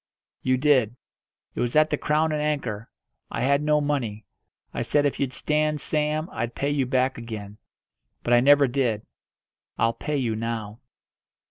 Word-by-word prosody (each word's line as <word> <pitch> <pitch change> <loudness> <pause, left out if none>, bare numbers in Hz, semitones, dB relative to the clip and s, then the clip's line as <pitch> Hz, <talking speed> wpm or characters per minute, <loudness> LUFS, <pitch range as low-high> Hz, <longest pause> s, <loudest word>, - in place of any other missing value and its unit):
"You 130 0 +2
did. 130 -5 +3 0.6
It - - -6
was 120 +2 -1
at 155 0 +4
the - - +3
'Crown 155 +1 +1
and 150 -1 -1
Anchor.' 125 -8 -2 0.4
I - - -3
had 140 +3 +3
no 150 0 +3
money. 125 -8 -2 0.5
I - - -2
said 145 -1 +2
if 145 - 0
you'd 135 -2 0
stand 150 +3 0
Sam 155 +1 -1
I'd 120 +1 -4
pay 140 +1 -1
you 140 -3 0
back 130 0 +1
again; 105 -3 -8 0.6
but 120 - +1
I 120 - +7
never 140 +2 +6
did. 120 -5 0 0.7
I'll 115 0 +2
pay 150 +4 -3
you 120 -5 -1
now." 110 -1 -4
135 Hz, 165 wpm, -25 LUFS, 115-150 Hz, 0.7 s, I